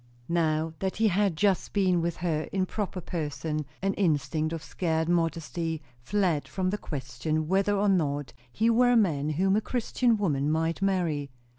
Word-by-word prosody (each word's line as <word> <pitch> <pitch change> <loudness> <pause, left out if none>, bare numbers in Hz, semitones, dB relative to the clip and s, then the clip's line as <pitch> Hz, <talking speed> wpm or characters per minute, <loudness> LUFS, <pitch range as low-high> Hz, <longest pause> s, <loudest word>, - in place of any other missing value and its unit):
Now 160 -1 +1
that 190 -1 -2
he 220 0 +4
had 195 -1 +1
just 195 +2 +1
been 185 -4 +3
with 170 0 -2
her 155 -2 0
in 190 -1 +1
proper 190 -2 -4
person, 155 -2 -3 0.2
an 195 0 +2
instinct 155 -4 0
of 165 -1 -4
scared 160 -2 -1
modesty 165 -1 -1 0.2
fled 175 +2 0
from 185 -1 -1
the 210 - -2
question 145 +2 -3
whether 195 +3 +2
or 205 +1 +2
no 150 -7 +2 0.3
he 220 - +1
were 245 +2 +4
a - - +5
man 155 -9 +2
whom 190 +5 +2
a 215 - +2
Christian 240 0 +1
woman 150 -8 0
might 165 +3 0
marry. 170 -7 0
170 Hz, 170 wpm, -28 LUFS, 155-195 Hz, 0.3 s, a